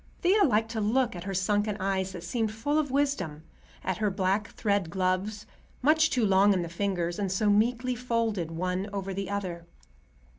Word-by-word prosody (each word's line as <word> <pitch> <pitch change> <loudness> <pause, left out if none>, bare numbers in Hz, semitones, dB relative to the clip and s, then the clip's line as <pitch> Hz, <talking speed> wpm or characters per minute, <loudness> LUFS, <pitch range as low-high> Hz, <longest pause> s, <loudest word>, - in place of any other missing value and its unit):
Thea 395 +4 +5
liked 225 -2 +1
to 220 -2 -2
look 230 +1 +1
at 175 0 -7
her 195 - -3
sunken 205 +2 +1
eyes 190 -1 -1
that 175 -2 -8
seemed 220 +4 -1
full 290 +8 0
of 295 -2 -1
wisdom, 260 - -1 0.4
at 185 - -1
her 215 -1 +1
black 195 +2 0
thread 200 -5 0
gloves, 190 +4 -1 0.4
much 315 +3 +5
too 245 -4 +1
long 200 +1 +5
in 180 -2 0
the 170 - -5
fingers 175 -1 -2
and 195 -2 -1
so 205 +2 +2
meekly 240 +4 +2
folded 230 -7 -1
one 180 +4 -2
over 195 -1 -4
the 195 0 -4
other. 180 -4 -4
200 Hz, 185 wpm, -28 LUFS, 185-225 Hz, 0.4 s, Thea